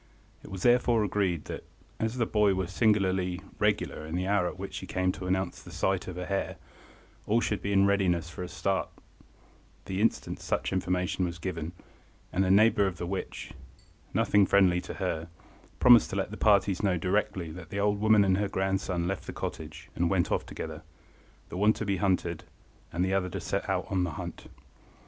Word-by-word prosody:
It - - -11
was 95 -1 -6
therefore 120 -2 +4
agreed 95 -5 0
that, - - -6 0.4
as 110 +3 -1
the 120 - +2
boy 105 -3 +3
was 95 -1 -2
singularly 95 -4 +2 0.2
regular - - 0
in 80 +2 -5
the 90 +1 -1
hour 100 -2 +2
at 90 - -6
which 95 0 -6
he 95 - -9
came 95 0 +1
to 90 - -7
announce 95 0 -1
the - - -12
sight 95 -1 -1
of 90 - -5
the 90 0 -4
hare, 100 +1 -2 0.7
all 110 +3 +3
should 105 -3 -1
be 100 - -2
in 100 0 +5
readiness 90 -4 +2
for 85 - -8
a 90 - -3
start 95 +1 -1 1.0
the 95 +1 -2
instant 115 - 0
such - - -2
information 90 0 0
was 85 -1 -2
given, 85 -2 -4 0.6
and 95 - +2
a 95 - +1
neighbour 100 0 +5
of 90 -2 -4
the 85 - -4
witch, 95 +2 -5 0.6
nothing 100 -2 +3
friendly 90 -3 +4
to - - -7
her, 85 -4 -2 0.5
promised 120 -3 +7
to - - -4
let 100 0 -1
the - - -5
parties 100 -3 +3
know 95 -4 +2
directly 90 -2 -1
that 85 0 -10
the 100 - -3
old 100 0 +1
woman 110 -2 +5
and 95 -1 +3
her 100 -1 0
grandson 95 -2 -1
left 95 0 -3
the - - -4
cottage - - -6
and 85 0 +1
went 95 -3 +1
off - - 0
together, - - -6 0.7
the - - -6
one 105 +3 +4
to 110 - -4
be 100 -1 0
hunted, 90 -3 0 0.5
and 90 +2 0
the 95 - 0
other 95 -1 +1
to 95 +2 -4
set 95 +4 -3
on 95 -1 0
the 90 - -1
hunt. - - -7
95 Hz, 200 wpm, -29 LUFS, 90-100 Hz, 1.0 s, promised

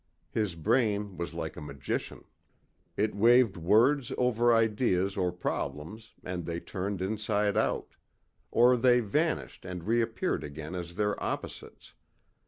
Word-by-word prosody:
His 105 -6 -1
brain 105 +2 +1
was 85 0 -5
like 80 -2 -4
a - - -8
magician. 70 -3 -5 0.7
It 105 +1 +1
waved 115 +1 +5
words 120 - +3
over 120 -1 +3
ideas 105 -4 +2
or 90 -2 0
problems 90 +4 -5
and 90 -1 -4
they 85 +1 -4
turned 95 +1 -4
inside 105 0 0
out. - - 0 0.6
Or 125 +2 +5
they 125 +1 +5
vanished 150 +10 -1
and 90 -2 -6
reappeared 115 +3 0
again 75 +3 -7
as 85 -1 -6
their 105 +1 -1
opposites. - - -6
105 Hz, 130 wpm, -29 LUFS, 90-115 Hz, 0.7 s, waved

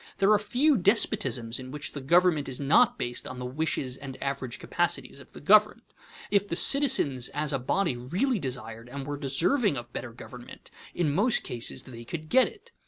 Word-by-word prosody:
There 195 +2 +3
are 210 - +5
few 255 +7 +2
despotisms 130 - 0
in 130 0 -8
which 150 +2 -6
the 140 - -7
government 165 0 +3
is 130 - -4
not 230 - +3
based 120 0 -4
on 130 - -7
the 125 - -6
wishes 130 -1 -2
and 135 -1 -9
average 135 -3 -4
capacities - - -2
of - - -15
the - - -10
governed. - - +4 0.5
If 200 0 +2
the 170 - -3
citizens 235 - +3
as 150 0 -1
a 135 - 0
body 170 +3 0
really 190 - -1
desired 120 -4 -6
and 135 +1 -6
were 145 0 -4
deserving 150 - +1
of 120 0 -9
better 125 - -6
government, 120 +1 -12 0.2
in 155 -5 0
most 215 - +2
cases 120 -1 -2
they 120 -3 -11
could 155 +5 -7
get 260 0 +5
it. 430 +3 -14
145 Hz, 190 wpm, -27 LUFS, 125-200 Hz, 0.5 s, are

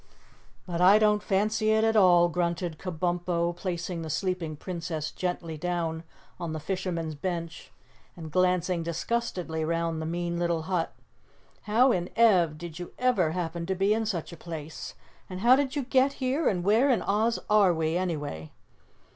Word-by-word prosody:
"But 175 -1 -3
I 190 +3 +7
don't 210 -1 +3
fancy 215 +2 +1
it 220 0 +3
at 225 0 +2
all," 175 -4 +6
grunted 170 -1 -2
Kabumpo, 175 -1 -1
placing 175 -1 -4
the 160 - -5
sleeping 170 -1 -2
Princess 165 -2 -4
gently 170 -3 -4
down 165 -1 -2 0.4
on 170 -3 -4
the 155 - -3
fisherman's 170 -2 -3
bench 170 +1 -5 0.5
and 160 -2 -8
glancing 180 0 +1
disgustedly 170 -1 -2
round 165 0 -1
the 160 - -3
mean 170 0 -2
little 170 -2 0
hut. 180 -1 -2 0.7
"How 245 +5 +5
in 180 -3 -1
Ev 185 -10 +4
did 170 0 -8
you 175 - -8
ever 205 -11 +2
happen 170 -1 -3
to 190 - 0
be 195 +3 +2
in 220 0 -1
such 175 -4 -3
a - - -10
place, 160 -2 -7 0.3
how 210 +7 +4
did 275 0 -1
you 285 - -1
get 265 +2 +2
here 270 +4 0
and 180 -3 -1
where 220 +8 +4
in 250 - +2
Oz 220 +3 +1
are 210 -3 +5
we, 160 -1 -1
anyway?" 150 - -3
175 Hz, 165 wpm, -27 LUFS, 165-205 Hz, 0.7 s, I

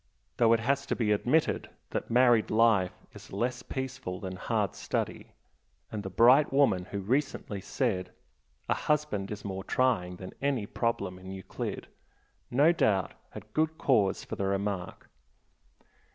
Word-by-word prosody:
Though 115 -2 +5
it 115 - +3
has 140 +3 0
to - - 0
be 110 -3 +1
admitted 125 +9 +1 0.2
that - - -3
married 120 -2 +4
life 110 -5 +2
is - - -13
less 120 +5 -1
peaceful 130 -9 -5
than 95 -2 -5
hard - - -1
study - - -3 0.6
and 105 - -3
the 95 - -5
bright 125 +10 +5
woman 135 -10 +3
who 100 +1 -5
recently 110 -3 -1
said, 90 0 -1 0.6
"A - - +3
husband 150 -10 -1
is 105 0 -6
more 95 -1 -4
trying 105 -8 +1
than 95 +1 -9
any 135 -6 0
problem 100 -5 -2
in 95 0 -10
Euclid," 95 -1 -5 0.6
no 145 +7 +5
doubt 100 - +1 0.2
had 110 +2 -11
good 160 0 +1
cause 105 -8 +2
for - - -6
the 100 - -2
remark. 100 -2 -3
110 Hz, 150 wpm, -29 LUFS, 95-130 Hz, 0.6 s, Though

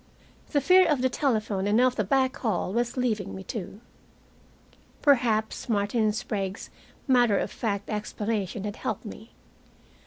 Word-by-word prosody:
The 285 - +2
fear 370 +6 +6
of 285 -5 +1
the 260 - +3
telephone 215 -8 0
and 210 +3 +3
of 255 0 +3
the 210 - 0
back 260 +5 +1
hall 200 -5 -1
was 240 +2 -1
leaving 220 -6 -1
me, 190 - -7
too. 210 -1 -7 1.2
Perhaps 235 -6 +2
Martin 215 +1 +1
Sprague's 210 -3 -4 0.4
matter 245 -6 +4
of - - -2
fact 205 -4 -3
explanation 210 -1 -3
had 210 +1 -5
helped - - -4
me. - - -10
220 Hz, 145 wpm, -27 LUFS, 205-250 Hz, 1.2 s, fear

